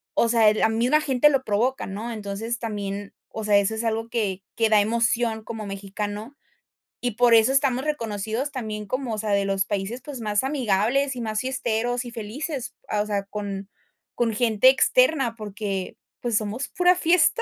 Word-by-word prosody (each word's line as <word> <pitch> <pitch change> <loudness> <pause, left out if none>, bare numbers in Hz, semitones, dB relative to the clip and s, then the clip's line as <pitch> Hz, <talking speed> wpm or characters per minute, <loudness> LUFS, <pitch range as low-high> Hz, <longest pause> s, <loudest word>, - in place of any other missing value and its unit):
o 235 - +3
sea, 225 -2 +5
la 215 - +2
misma 245 +7 +3
gente 285 0 +4
lo 270 -2 +1
provoca, 240 +5 0
¿no? 215 +5 -5
Entonces, 220 +2 -4
también, 205 -3 -4 0.2
o 220 - -6
sea, 205 -1 +5
eso 200 +2 +1
es 220 - -3
algo 225 +1 -1
que 200 -5 -2
que 225 -1 +3
da 210 -1 +5
emoción 230 0 0
como 220 -2 -6
mexicano, 205 +5 -5 0.7
y 245 -1 0
por 240 +2 +4
eso 225 +4 +5
estamos 275 -1 +2
reconocidos 230 -1 -2
también 215 -5 -5
como, 255 0 -2
o 215 - -3
sea, 215 0 -3
de 200 0 +2
los 195 0 +1
países, 205 +5 -3
pues, 275 -1 -8
más 210 +1 0
amigables, 265 +1 +1
y 245 - -5
más 215 -1 -2
fiesteros 245 -1 -1
y 240 - -7
felices, 250 +5 -5
ah, 210 - 0
o 210 - -1
sea, 200 -1 -1
con 200 -1 -5 0.5
con 230 -2 +1
gente 225 +1 +3
externa, 270 - +3
porque, 205 -2 -4 0.2
pues, 235 -3 -1
somos 220 +5 -3
pura 360 0 +3
fiesta. 360 +7 +3
225 Hz, 185 wpm, -24 LUFS, 210-255 Hz, 0.7 s, sea